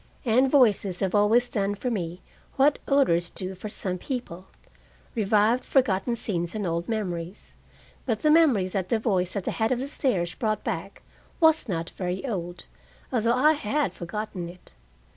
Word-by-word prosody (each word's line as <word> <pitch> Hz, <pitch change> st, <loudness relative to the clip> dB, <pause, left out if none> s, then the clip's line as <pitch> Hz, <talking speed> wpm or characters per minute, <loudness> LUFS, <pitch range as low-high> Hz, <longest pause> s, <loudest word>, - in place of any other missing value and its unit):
And 255 Hz, +3 st, +4 dB
voices 210 Hz, -9 st, +3 dB
have 190 Hz, -2 st, 0 dB
always 220 Hz, +4 st, +4 dB
done 205 Hz, -3 st, -1 dB
for 245 Hz, +5 st, -3 dB
me 180 Hz, -4 st, -4 dB, 0.3 s
what 280 Hz, +2 st, +3 dB
odors 175 Hz, -12 st, +3 dB
do 185 Hz, 0 st, -5 dB
for 190 Hz, +3 st, -7 dB
some 185 Hz, -3 st, -3 dB
people, 190 Hz, -9 st, -6 dB, 0.7 s
revived 215 Hz, +2 st, +2 dB
forgotten 235 Hz, -3 st, +1 dB
scenes 180 Hz, -5 st, -3 dB
and 210 Hz, -2 st, -2 dB
old 170 Hz, +2 st, -2 dB
memories. 180 Hz, -5 st, -4 dB, 0.5 s
But 225 Hz, -4 st, -1 dB
the 305 Hz, -, +5 dB
memory 285 Hz, -, +4 dB
that 185 Hz, -1 st, -3 dB
the 230 Hz, -, +2 dB
voice 190 Hz, -5 st, 0 dB
at 200 Hz, -, -2 dB
the -, -, -2 dB
head 220 Hz, 0 st, 0 dB
of 255 Hz, -, +2 dB
the 265 Hz, +3 st, -3 dB
stairs 195 Hz, -, -1 dB
brought 215 Hz, -2 st, -2 dB
back -, -, -5 dB, 0.4 s
was 320 Hz, -6 st, +4 dB
not 165 Hz, -2 st, -3 dB
very 185 Hz, +4 st, -4 dB
old, 175 Hz, -6 st, -5 dB, 0.5 s
although 235 Hz, 0 st, +2 dB
I 300 Hz, +5 st, +5 dB
had 290 Hz, +1 st, -1 dB
forgotten 180 Hz, -1 st, -5 dB
it. 180 Hz, +1 st, -15 dB
210 Hz, 165 wpm, -26 LUFS, 180-245 Hz, 0.7 s, the